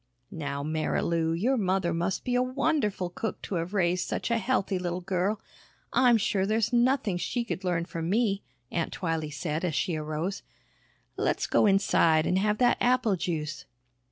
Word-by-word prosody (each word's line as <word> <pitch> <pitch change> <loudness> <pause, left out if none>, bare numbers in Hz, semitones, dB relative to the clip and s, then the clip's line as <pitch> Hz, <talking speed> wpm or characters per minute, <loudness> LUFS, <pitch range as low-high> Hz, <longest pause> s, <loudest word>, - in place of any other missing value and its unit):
"Now, 140 -3 -4
Marilou, 160 +1 0
your 255 +7 +2
mother 185 -4 +1
must 175 +3 -1
be 250 - -2
a 250 - +3
wonderful 255 - 0
cook 220 +5 -4
to - - -5
have 180 +5 -6
raised 175 -2 +1
such - - -2
a 230 - +2
healthy 200 -5 0
little 180 0 -3
girl. 190 +3 -1 0.5
I'm 245 -3 +5
sure 200 -2 0
there's 220 +3 +1
nothing 240 -5 +2
she 235 +6 -2
could 200 -4 -4
learn 175 -2 0
from 165 -1 -4
me," 205 -1 +1 0.3
Aunt 165 -2 -2
Twylee 165 -4 -2
said 150 +2 -3
as 170 -4 -1
she 175 +1 0
arose. 155 +5 -3 0.8
"Let's - - 0
go - - +3
inside 170 -5 +4
and 185 - +2
have 210 +1 +1
that 245 0 +3
apple 245 -4 +3
juice." 155 -4 -3
190 Hz, 170 wpm, -28 LUFS, 165-225 Hz, 0.8 s, I'm